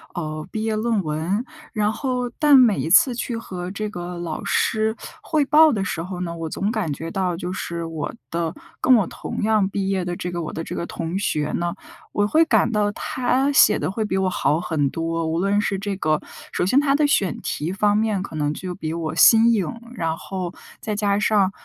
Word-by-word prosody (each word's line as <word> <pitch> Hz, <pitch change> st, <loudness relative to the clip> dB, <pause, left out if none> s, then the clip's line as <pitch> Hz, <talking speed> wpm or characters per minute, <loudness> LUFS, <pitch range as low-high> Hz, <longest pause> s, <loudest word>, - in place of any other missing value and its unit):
呃， 155 Hz, -2 st, -4 dB
毕 220 Hz, 0 st, -3 dB
业 220 Hz, -1 st, 0 dB
论 215 Hz, -2 st, 0 dB
文， 160 Hz, +9 st, -1 dB, 0.3 s
然 210 Hz, -1 st, +1 dB
后 250 Hz, 0 st, -2 dB
但 295 Hz, -3 st, +7 dB
每 235 Hz, -5 st, +5 dB
一 160 Hz, -, -2 dB
次 245 Hz, +8 st, +6 dB
去 235 Hz, 0 st, -3 dB
和 180 Hz, -5 st, -6 dB
这 210 Hz, +2 st, -4 dB
个 175 Hz, -3 st, -6 dB
老 170 Hz, -3 st, -4 dB
师 220 Hz, 0 st, +1 dB, 0.3 s
汇 310 Hz, -2 st, +1 dB
报 305 Hz, +2 st, +6 dB
的 200 Hz, -4 st, -1 dB
时 165 Hz, -4 st, -3 dB
候 180 Hz, +1 st, -6 dB
呢 170 Hz, -2 st, -3 dB
我 165 Hz, -1 st, -4 dB
总 200 Hz, +6 st, -1 dB
感 210 Hz, -9 st, -1 dB
觉 165 Hz, +3 st, -6 dB
到 185 Hz, -3 st, -1 dB
就 175 Hz, +1 st, -5 dB
是 170 Hz, -2 st, -4 dB
我 165 Hz, -2 st, -4 dB, 0.2 s
的 165 Hz, -1 st, -2 dB, 0.3 s
跟 255 Hz, -, +5 dB
我 215 Hz, -5 st, +3 dB
同 -, -, -6 dB
样 215 Hz, -2 st, +3 dB
毕 195 Hz, -1 st, -2 dB
业 190 Hz, -2 st, 0 dB
的 175 Hz, 0 st, -3 dB
这 180 Hz, 0 st, -4 dB
个 175 Hz, -, -3 dB
我 155 Hz, -, -5 dB
的 160 Hz, -, -4 dB
这 -, -, -6 dB
个 170 Hz, -, -3 dB
同 170 Hz, +4 st, -4 dB
学 150 Hz, -6 st, -1 dB
呢， 175 Hz, 0 st, -1 dB, 0.4 s
我 205 Hz, -, +2 dB
会 315 Hz, +10 st, +4 dB
感 235 Hz, -7 st, +3 dB
到 210 Hz, -2 st, +1 dB
他 260 Hz, +5 st, 0 dB
写 215 Hz, -6 st, +6 dB
得 -, -, -2 dB
会 215 Hz, +2 st, -2 dB
比 190 Hz, -2 st, -1 dB
我 190 Hz, -1 st, +1 dB
好 150 Hz, -4 st, +1 dB
很 150 Hz, -5 st, 0 dB
多， 165 Hz, +2 st, -2 dB
无 160 Hz, +1 st, -1 dB
论 200 Hz, +3 st, +2 dB
是 195 Hz, -1 st, 0 dB
这 195 Hz, 0 st, -3 dB
个 155 Hz, -4 st, +1 dB, 0.3 s
首 180 Hz, -, 0 dB
先 255 Hz, +9 st, +4 dB
他 280 Hz, -1 st, +2 dB
的 300 Hz, +1 st, +3 dB
选 195 Hz, -, +1 dB
题 160 Hz, +5 st, -3 dB
方 205 Hz, +1 st, +2 dB
面 215 Hz, -3 st, 0 dB
可 160 Hz, -, -7 dB
能 150 Hz, 0 st, 0 dB
就 180 Hz, +3 st, -5 dB
比 160 Hz, -3 st, -4 dB
我 165 Hz, -2 st, -3 dB
新 225 Hz, +5 st, +7 dB
颖， 195 Hz, -8 st, +1 dB, 0.3 s
然 165 Hz, -5 st, -1 dB
后 180 Hz, 0 st, -5 dB, 0.3 s
再 215 Hz, -1 st, -3 dB
加 205 Hz, -1 st, +1 dB
上， 205 Hz, -3 st, +3 dB
195 Hz, 240 characters per minute, -22 LUFS, 170-220 Hz, 0.4 s, 但